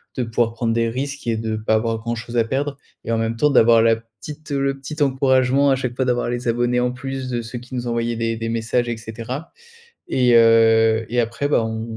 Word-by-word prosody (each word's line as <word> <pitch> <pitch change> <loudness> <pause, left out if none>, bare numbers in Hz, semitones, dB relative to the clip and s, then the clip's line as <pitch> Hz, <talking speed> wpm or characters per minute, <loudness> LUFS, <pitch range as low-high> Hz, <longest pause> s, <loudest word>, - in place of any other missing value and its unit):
de 125 - -1
pouvoir 115 0 0
prendre 115 -1 -1
des 115 0 +1
risques 140 +4 -5
et 115 -1 0
de 110 0 -3
pas 110 0 -1
avoir 115 +1 0
grand-chose 120 +1 -5
à 115 - +4
perdre 140 +3 -2 0.3
et 115 - -3
en 115 - +1
même 115 0 -1
temps 150 +5 +3
d'avoir 115 -4 +5
la 115 0 +4
petite 130 +7 -12
le 135 -1 0
petit 150 +3 -7
encouragement 130 0 +2
à - - +4
chaque 125 -2 -4
fois 130 - 0
d'avoir 120 -1 0
les 120 0 -3
abonnés 120 +1 +1
en 125 0 0
plus 130 +1 -5
de 120 -1 -2
ceux 115 +2 -7
qui 125 +2 -14
nous 120 -1 -3
envoyaient 115 0 -1
des 115 0 -1
des 115 0 -4
messages, 115 +1 -1
et 120 - -3
cetera. 115 +7 -7 0.6
Et 125 -2 +3
heu, 115 -1 +5
et 120 +1 +1
après 115 +5 -2
bah 130 -6 +2
on 110 0 -5
120 Hz, 230 wpm, -21 LUFS, 115-130 Hz, 0.6 s, d'avoir